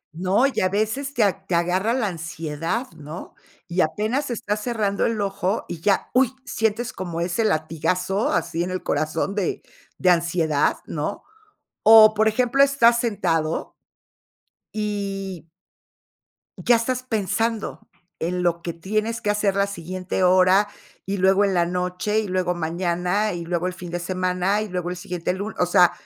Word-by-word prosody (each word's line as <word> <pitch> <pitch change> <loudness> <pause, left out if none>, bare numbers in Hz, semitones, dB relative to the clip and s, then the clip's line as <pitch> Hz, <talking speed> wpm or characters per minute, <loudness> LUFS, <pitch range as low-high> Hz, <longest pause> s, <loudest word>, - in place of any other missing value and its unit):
No, 190 +8 +2
y 275 - 0
a 185 - +2
veces 220 +8 -1
te 235 - +3
a 195 -1 0
te 180 - 0
agarra 180 +5 +1
la 250 -3 0
ansiedad, 165 - -3
¿no? 155 +2 -9 0.3
Y 180 +1 +1
apenas 215 - -1
estás 210 -3 -2
cerrando 210 -4 0
el 230 -2 -2
ojo 195 +1 -1
y 165 - -7
ya, 200 +2 +1
¡uy! 255 -1 +4
Sientes 225 -1 -1
como 175 -3 -5
ese 175 +6 0
latigazo 180 +3 0
así 170 0 0
en 180 - -3
el 185 0 -4
corazón 155 +5 -1
de 200 -5 -1 0.4
de 185 - +2
ansiedad, 165 -3 +1
¿no? - - -4 0.6
O, 220 0 +8
por 215 +1 +2
ejemplo, 245 +4 +2
estás 240 -4 +4
sentado 170 -9 -1 1.0
y 195 -4 -3 1.1
Ya 240 - +4
estás 245 +2 -1
pensando 225 -1 -2 0.3
en 180 +2 -1
lo 170 -1 +1
que 170 0 -4
tienes 215 +6 -2
que 205 - +1
hacer 205 -1 +1
la 200 0 +3
siguiente 185 0 -3
hora, 185 +2 +5 0.4
y 195 +1 -2
luego 190 +2 +4
en 200 -1 +1
la 175 -1 +3
noche, 180 +4 -1
y 215 - -2
luego 185 -1 0
mañana, 180 +4 -1
y 170 -1 -4
luego 175 +1 -1
el 185 - -3
fin 180 -1 -8
de 175 +1 -3
semana, 185 +2 0
y 215 - -4
luego 180 -1 -3
el - - -4
siguiente 180 0 -3
lu 200 +4 -5
o 180 - +3
sea, 180 0 +5
190 Hz, 165 wpm, -23 LUFS, 175-215 Hz, 1.1 s, O